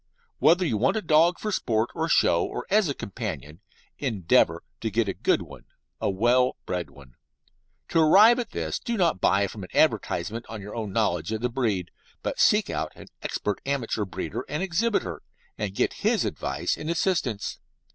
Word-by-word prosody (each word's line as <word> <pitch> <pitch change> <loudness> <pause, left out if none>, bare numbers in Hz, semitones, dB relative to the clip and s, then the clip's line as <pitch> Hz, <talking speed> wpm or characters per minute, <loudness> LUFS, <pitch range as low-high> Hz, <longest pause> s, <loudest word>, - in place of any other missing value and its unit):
Whether 175 +3 +4
you 120 -9 0
want 130 - +2
a - - -1
dog 165 +2 +4
for 215 - -3
sport, 115 - 0
for 160 +1 -2
show, 85 - +4
or - - -4
as 205 -5 +4
a 140 - -2
companion, 80 -4 -6 0.4
endeavour 110 - +2 0.2
to 110 - -2
get 110 +1 0
a 95 - -1
good 95 -1 +1
one 70 -6 -13 0.3
a - - 0
well 120 +6 +2
bred 90 -1 -3
one. 70 -3 -17 0.8
To 165 - +2
arrive 210 +10 +7
at 240 - -3
this - - -3
do 235 -1 -3
not 170 - +1
buy 100 +1 +3
from 100 0 -7
an 90 - -9
advertisement 110 +7 +1
on 110 -1 -6
your 100 +1 -8
own 110 -4 -4
knowledge 100 -4 0
of 110 0 -2
the 125 - 0
breed, 110 -8 -1 0.3
but - - -3
seek - - +4
out - - -3
an - - -13
expert 105 -1 -3
amateur 130 -6 -1
breeder 95 - -5
and 150 +5 -2
exhibitor, 180 - -1 0.3
and 100 -2 -4
get - - +1
his - - +2
advice - - -2
and 155 - -5
assistance. 160 - -1
115 Hz, 185 wpm, -26 LUFS, 100-160 Hz, 0.8 s, arrive